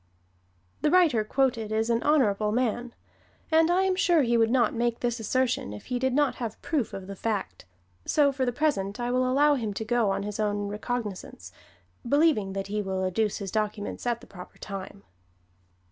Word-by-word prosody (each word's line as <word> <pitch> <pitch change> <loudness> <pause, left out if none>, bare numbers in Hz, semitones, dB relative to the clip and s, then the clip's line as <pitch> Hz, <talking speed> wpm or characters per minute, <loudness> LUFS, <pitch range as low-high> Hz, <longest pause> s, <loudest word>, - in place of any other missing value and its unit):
The - - +3
writer 310 -11 +4
quoted 230 -2 0
is 220 +2 +1
an 230 0 +1
honorable 215 -9 +2
man, 240 0 -1 0.6
and 320 +1 +4
I 365 +2 +3
am 380 -1 +1
sure 345 -4 +3
he 240 -1 +1
would 225 -1 +3
not 240 -2 +2
make 235 0 -1
this 240 -1 -1
assertion 245 - 0
if 105 - -10
he 245 - 0
did 260 +1 +1
not 290 0 +2
have 230 -3 -5
proof 290 -9 -1
of 195 - -7
the 200 +1 -7
fact. 195 - -3 0.4
So, 290 -2 +4
for 270 -1 -2
the 245 - +1
present, 245 -7 -1
I 240 0 -1
will 255 0 +1
allow 290 +3 +4
him 220 -7 -2
to 220 - -4
go 235 -2 +2
on 195 0 -1
his 210 +1 -5
own 205 -1 -1
recognizance, 210 - -5 0.5
believing 275 -8 +2
that 195 0 -3
he 210 +1 -2
will 190 -1 -2
adduce 210 +3 0
his 195 -2 -5
documents 215 +1 -3
at 240 -1 0
the - - -13
proper 180 -2 -12
time. 195 0 -8
230 Hz, 190 wpm, -27 LUFS, 205-260 Hz, 0.6 s, writer